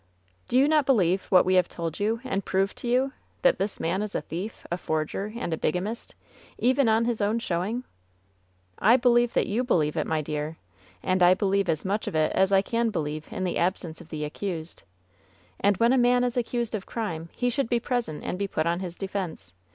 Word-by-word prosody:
"Do 245 - +1
you 270 +2 +5
not 300 -3 +3
believe 190 -8 +3
what 185 -2 +5
we 185 - +2
have 185 -1 +4
told 165 -2 -5
you 220 +3 0
and 200 -7 -2
proved 195 +2 0
to - - -5
you 260 +3 +2
— - - -38
that - - +4
this 200 - -2
man 180 +4 0
is 210 -1 -4
a - - 0
thief, 185 +7 -6
a 175 - 0
forger 160 +7 -2
and 175 -8 -3
a - - -1
biga 155 +3 0
mist, 225 +3 -6 0.4
even 255 0 +3
on 220 +1 +3
his 235 -2 -1
own 210 +3 +2
showing 215 +3 -2 0.5
?" 90 0 -31
"I - - +7
believe 240 -1 +3
that - - +3
you 225 +5 0
believe 155 - +1
it, - - -1
my 160 -1 0
dear. 150 +1 -4 0.5
And 185 0 +1
I 180 +1 +7
believe 195 -1 +1
as 160 +1 0
much 205 +3 -1
of - - -3
it 155 0 +2
as 190 +1 +2
I 195 0 +5
can 230 +1 0
believe 155 -5 -3
in 185 - -4
the 180 - -1
absence 175 -2 -1
of 170 - -14
the 155 -2 -4
ac 150 - -4
cused. 170 -5 -4 0.8
And 200 -1 +3
when 235 +4 +4
a 265 - +4
man 245 0 +4
is 245 -1 -1
accused 240 -1 -1
of 205 -3 -4
crime 170 -8 -4
he 245 0 0
should 255 -1 -1
be 240 - +2
present 235 - -2
and 180 - -3
be 200 - 0
put 155 -4 -1
upon 170 +1 +1
his 180 -2 -5
defense. 180 - -5
195 Hz, 230 wpm, -26 LUFS, 165-235 Hz, 0.8 s, I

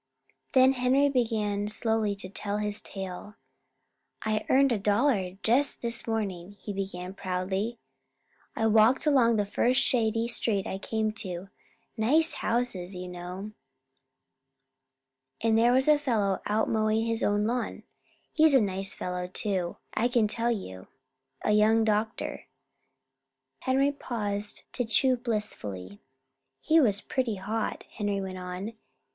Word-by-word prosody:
Then 260 0 +6
Henry 265 +3 +3
began 215 -5 0
slowly 220 -1 0
to 195 -1 -7
tell 205 +1 -4
his 210 0 -2
tale. 195 +1 -7 0.9
"I 215 -1 -1
earned 275 0 +4
a 225 - +1
dollar 200 -3 +1
just 255 +5 +2
this 235 0 -1
morning," 200 -4 -3
he 205 - -6
began 190 -2 -5
proudly. 190 +4 -2 0.8
"I 225 - 0
walked 220 +5 +4
along 255 -6 +4
the 205 -1 +1
first 245 +5 +2
shady 225 -1 +1
street 210 -4 -1
I 190 - -4
came 220 +1 -1
to 185 0 -6 0.5
nice 305 +10 +3
houses, 200 -6 -1
you 180 0 -6
know. 180 +3 -7 1.9
And 225 -1 +2
there 235 +2 +5
was 260 +2 +3
a 300 -1 +5
fellow 215 -9 0
out 215 +1 +1
mowing 220 0 +1
his 230 0 -1
own 205 0 +1
lawn. 240 +2 -2 0.5
He's 310 -2 +5
a - - +7
nice 195 -2 -1
fellow, 180 0 -4
too, 185 -2 -2 0.2
I 235 - +2
can 240 -3 +2
tell 230 +2 -1
you 95 - -4 0.6
a - - +2
young 215 +2 +4
doctor." 220 +1 -1 1.1
Henry 270 +2 +2
paused 210 -7 -4
to 250 - +1
chew 255 +3 +3
blissfully. 105 - -4 0.6
"He 320 +1 +4
was 205 -8 +5
pretty 255 -5 -1
hot," 210 +4 -3
Henry 205 -2 -2
went 190 -1 -5
on. 180 +4 -5
215 Hz, 135 wpm, -28 LUFS, 195-235 Hz, 1.9 s, a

